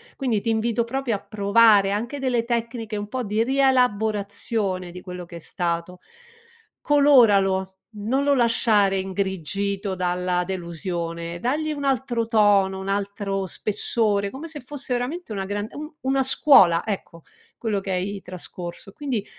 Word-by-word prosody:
quindi 240 -7 -1
ti 230 - -2
invito 225 +1 +1
proprio 250 0 -2
a - - -4
provare 205 -1 +4
anche 235 +7 -3
delle 250 -3 0
tecniche 230 -2 -3
un 205 0 -4
po' 255 +4 -3
di 215 +1 0
rielaborazione 220 -7 +1
di 180 +1 -9
quello 180 -1 -8
che 170 0 -10
è - - -9
stato. 170 +1 -3 0.8
Coloralo, 205 -10 +4 0.2
non 240 +7 0
lo 285 0 +4
lasciare 220 -5 +3
ingrigito 195 +1 -2
dalla 180 0 0
delusione, 170 -2 -4
dagli 300 - -1
un 285 -1 -5
altro 255 -4 0
tono, 205 -4 +3
un 190 +1 -5
altro 200 -1 -2
spessore, 205 +1 0
come 275 +9 -8
se 305 -1 -7
fosse 270 0 -4
veramente 250 +5 -3
una 195 -2 -3
gran 205 +1 -3
un 305 +2 -8
una 270 +1 +1
scuola, 195 - +5
ecco, 185 -5 -5 0.3
quello 215 -4 -1
che 195 - -5
hai 195 +2 -2
trascorso. 180 0 -8
Quindi 245 -4 -3
205 Hz, 145 wpm, -23 LUFS, 190-245 Hz, 0.8 s, scuola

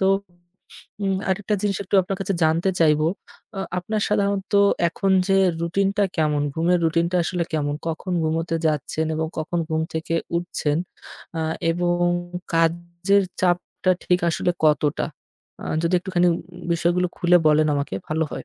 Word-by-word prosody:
তো 190 - +3 1.0
উম 195 -1 +1 0.2
আরেকটা 205 +2 0
জিনিস 200 -2 0
একটু 195 - -4
আপনার 190 +2 -3
কাছে 195 0 -1
জানতে 165 +4 +2
চাইবো, 155 -1 +4 0.5
আ - - -1 0.2
আপনার 210 +4 -2
সাধারণত 200 0 0 0.4
এখন 195 +3 -1 0.2
যে 195 - +4 0.3
রুটিনটা 195 +4 +1
কেমন? 150 -2 +1
ঘুমের 175 +2 +2
রুটিনটা 170 +2 +1
আসলে 175 -1 -1
কেমন? 145 -2 0
কখন 170 +3 -4
ঘুমোতে 165 +1 -1
যাচ্ছেন 155 +1 -1
এবং 160 0 -1
কখন 165 +2 -2
ঘুম 160 0 0
থেকে 160 +1 -2 0.2
উঠছেন? 160 -3 -1 0.6
আ - - 0 0.3
এবং 175 +1 +1 0.6
কাজের 170 +4 +2 0.2
চাপটা 180 +1 0
ঠিক 180 0 +2
আসলে 175 - 0
কতটা? 150 -1 +2 0.6
আ - - -7 0.2
যদি 170 +2 +1
একটুখানি 180 -1 +1 0.5
বিষয়গুলো 175 +2 +1
খুলে 175 0 +4
বলেন 155 0 +4
আমাকে 140 -8 -2
ভালো 160 +1 0
হয়। - - -6
170 Hz, 145 wpm, -23 LUFS, 160-185 Hz, 1.0 s, চাইবো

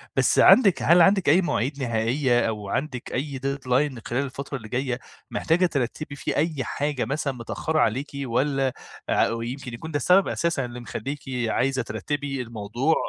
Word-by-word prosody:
بس - - +3
عَندِك 200 -8 +6
هل 170 +1 +6
عَندِك 190 -3 +4
أي 175 +6 +6
مواعيد 140 -4 -1
نهائيّة 120 +2 +1
أو 105 -2 -5
عندِك 130 -1 -3
أي 135 +1 -3
deadline 135 -1 0
خلال 125 +4 -1
الفترة 135 +1 -5
اللي 110 -3 -10
جايّة؟ 125 0 -1 0.3
محتاجة 175 +3 +2
ترتّبي 145 0 -2
فيه - - -3
أي 155 -3 0
حاجة 145 -5 -2
مثلًا 140 +1 -2
متأخّرة 155 +6 -2
عليكِ 130 +6 +1 0.2
والّا 135 +1 0 0.4
ع - - +3
ويمكن 120 +2 -5
يكون 160 +7 -7
ده 145 - 0
السبب 180 +7 +4
أساسًا 170 -7 0
اللي 120 0 -7
مخلّيكِ 135 +4 -5 0.3
عايزة 130 +3 +1
ترتّبي 140 +2 -3
الموضوع؟ 115 +6 -1
135 Hz, 160 wpm, -25 LUFS, 120-150 Hz, 0.4 s, عَندِك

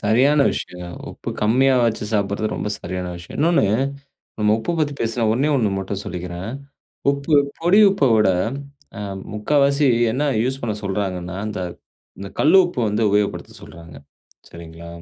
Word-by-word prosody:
சரியான 130 +8 +3
விஷயங்க. 90 0 -6 0.2
உப்பு - - -7
கம்மியா 130 +5 +4
வச்சு 110 -2 -1
சாப்பிட்றது, 100 +1 0
ரொம்ப - - -3
சரியான 90 -1 -4
விஷயம்! 85 0 -10
இன்னொன்னு, 170 -8 +3 0.7
நம்ம 105 0 +3
உப்ப 170 +9 -2
பத்தி 145 -2 0
பேசின, 115 0 0
ஒண்ணே 135 +6 +1
1 110 -5 +1
மட்டும் 95 +1 -4
சொல்லிக்கிறேன். 90 +3 -5 0.6
உப்பு, 140 +2 -1 0.3
பொடி 175 +6 +5
உப்ப 190 -8 +2
விட, 105 -3 +4 0.7
அ, - - -5 0.3
முக்காவாசி 140 +5 +2 0.3
என்ன 145 +4 0 0.2
யூஸ் 130 +2 -2
பண்ண 110 -3 -1
சொல்றாங்கனா, 95 -2 -3
அந்த 105 -3 -4 0.6
இந்த 100 - -6
கல்லு 155 +6 +5
உப்பு 175 -8 -3
வந்து 105 +2 0
உபயோகப்படுத்த 105 0 0
சொல்றாங்க, 85 -2 -12 0.5
சரிங்களா? 85 0 -11
110 Hz, 145 wpm, -21 LUFS, 95-140 Hz, 0.7 s, பொடி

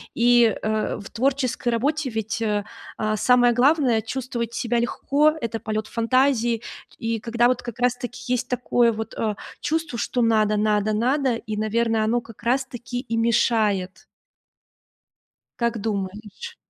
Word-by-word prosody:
и, 240 -2 +4
э-э, 215 0 -1
в 200 - -9
творческой 255 0 0
работе 280 +5 0
ведь, 220 -1 -3
э, 210 -2 0 0.3
а-а, 215 0 -1
самое 245 +1 +4
главное- 255 -2 +3
чувствовать 235 0 -4
себя 235 0 0
легко, 285 +5 +2
это 230 -1 -3
полет 215 0 -3
фантазии, 235 -1 +1 0.4
и 225 0 -2
когда 235 +2 +2
вот 250 0 0
как 240 -1 -8
раз 250 0 +2
таки 245 0 -7
есть 250 - 0
такое 245 -1 +2
вот, 220 0 -5
э, 215 -2 -1 0.2
чувство, 310 -4 -2
что 245 - -1
надо, 215 -2 +3
надо, 210 0 +1
надо, 255 +3 +1
и, 215 -2 -5
наверно, 225 +1 +1
оно 235 +2 +1
как 230 -1 -15
раз 260 +3 +1
таки 245 -1 -6
и 230 -3 -3
мешает. 215 -5 +1 1.5
Как 235 -1 0
думаешь? 210 - -5
235 Hz, 145 wpm, -23 LUFS, 220-250 Hz, 1.5 s, и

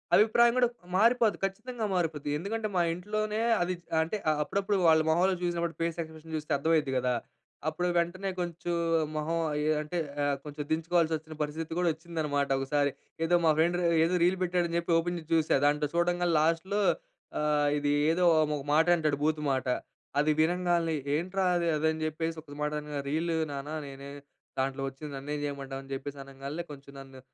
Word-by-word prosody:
అభిప్రాయం 235 +2 +5
గూడా 245 -1 +5 0.3
మారిపోద్ది. 230 0 +4
ఖచ్చితంగా 220 +4 -4
మారిపోద్ది. 155 -4 -1
ఎందుకంటే, 215 +5 -3
మా 175 - +4
ఇంట్లోనే 215 +4 -2 0.2
అది 180 +1 +1 0.3
అంటే, 170 +7 -3
అ - - +5
అప్పుడప్పుడు 200 +4 0
వాళ్ళ 160 0 +6
మొహంలో 180 +3 +3
చూసినప్పుడు. 170 -1 -1
ఫేస్ 165 0 -1
ఎక్స్ప్రెషన్ 160 0 -11
చూస్తే 150 - -7
అర్థమైద్ది 150 -2 +1
గదా. 125 0 +1 0.5
అప్పుడు 175 +3 0
వెంటనే 185 +3 0
కొంచెం 175 0 -3 0.4
మొహం 155 +2 -1 0.2
అయే 150 +1 0
అంటే, 155 +4 -4 0.5
కొంచెం 150 0 -6
దించుకోవాల్సి 165 0 +2
వచ్చిన, 155 0 -11
పరిస్థితి 160 +2 -4
గూడా 175 - +3
వచ్చిందనమాట 155 -4 -2
ఒకసారి. 140 +1 +1 0.3
ఏదో 175 +2 +3
మా 160 - +6
ఫ్రెండ్ 170 +2 +3 0.3
ఏదో 170 +3 +2
రీల్ 185 +2 +3
పెట్టాడు 175 -1 +1
అని 170 - 0
చెప్పి 170 0 -3
ఓపెన్ 175 +1 -1
జేసి 160 0 -14
చూసా. 155 -3 +3
దాంట్లో 150 0 +2
చూడంగాల్నే, 175 -1 +2
లాస్ట్‌లో 165 +6 +1 0.6
ఆహ్, 150 -1 +2
ఇది 145 0 0 0.2
ఏదో, 180 +2 +2 0.3
ఒక 140 - -5
మాట 160 +3 +4
అంటాడు. 155 -4 0
బూతు 155 0 +1
మాట. 130 -1 -2 0.5
అది 155 +1 +3
వినంగాన్లే, 170 0 +2 0.2
"ఏంట్రా 185 +5 0
అది?" 170 -1 +1
అది 155 +1 +1
అని 160 - -5
చెప్పేసి 160 +1 -2
ఒక 145 -2 -12
మాట 150 0 0
అనగా, 150 -1 -5
"రీల్ 160 +4 0 0.2
నాన్న. 140 +1 -5 0.2
నేనే 140 0 -9 0.5
దాంట్లో 135 +1 -1
వచ్చింది 140 +2 -7
నన్నేం 145 +2 -4
చేయమంటావు!" 135 -1 -4
అని 135 - -14
చెప్పేసి 140 +1 -5
అనంగాన్లే. 140 +4 -6
కొంచెం 140 0 -11
నన్ను 135 -1 -12
160 Hz, 170 wpm, -29 LUFS, 150-175 Hz, 0.6 s, వాళ్ళ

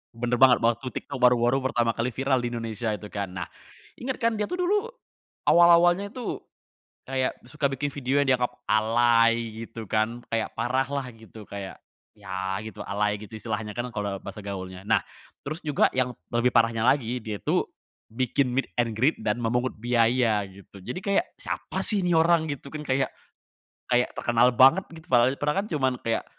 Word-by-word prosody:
bener 120 +1 -1
banget 130 -2 +6
waktu 120 +3 +1
TikTok 140 - -5
baru-baru 125 +1 +4
pertama 120 -3 +1
kali 115 +2 -2
viral 135 0 +1
di 120 0 -3
Indonesia 115 -1 -3
itu 105 0 -7
kan. 100 -3 -4
Nah, 90 -1 -4 0.5
ingat 260 +1 -3
kan 230 -1 +1
dia 210 - 0
tuh - - -3
dulu, 415 +5 +1 0.6
awal-awalnya 175 +3 +6
itu, 250 -3 -4 0.7
kayak 130 -1 -1
suka 140 +1 -1
bikin 140 +1 -3
video 140 0 0
yang 140 - +2
dianggap 125 -1 0 0.2
alay 115 0 +3
gitu 115 -1 -8
kan, 110 +4 -1
kayak 115 -1 0
parah 130 +2 0
lah 140 -2 -2
gitu 110 -1 -13
kayak, 100 -1 -7 0.4
ya 95 -1 -3
gitu 110 - -9
alay 105 +1 0
gitu 110 +1 -9
istilahnya 110 -1 -4
kan 120 - -1
kalau 100 -2 -2
bahasa 100 +2 -9
gaulnya. 95 -2 -6
Nah, - - +3 0.4
terus 155 +4 -4
juga 150 -3 +3
yang 130 -1 +1 0.2
lebih 120 +1 +3
parahnya 115 -2 +2
lagi 125 -1 +2
dia 105 -2 -5
tuh, - - 0 0.5
bikin 130 +2 +1
meet 135 +2 -1
and 120 -2 0
greet 140 +7 +3
dan 105 +2 0
memungut 120 +2 0
biaya, 115 -2 +2
gitu. 95 +1 -15
Jadi 125 - -5
kayak, 200 - +2 0.2
"Siapa - - -4
sih 200 -4 +1
nih 175 - +2
orang?" 165 0 +4
Gitu 140 -2 -5
kan 155 -1 -6
kayak, 135 0 0 0.8
kayak 125 0 +2
terkenal 120 +1 +3
banget 135 +10 +6
gitu 160 - -12
padahal 125 +1 +4
padahal 150 +4 0
kan - - -8
cuman 130 -3 +1
kayak, 115 0 0
120 Hz, 175 wpm, -26 LUFS, 110-140 Hz, 0.8 s, banget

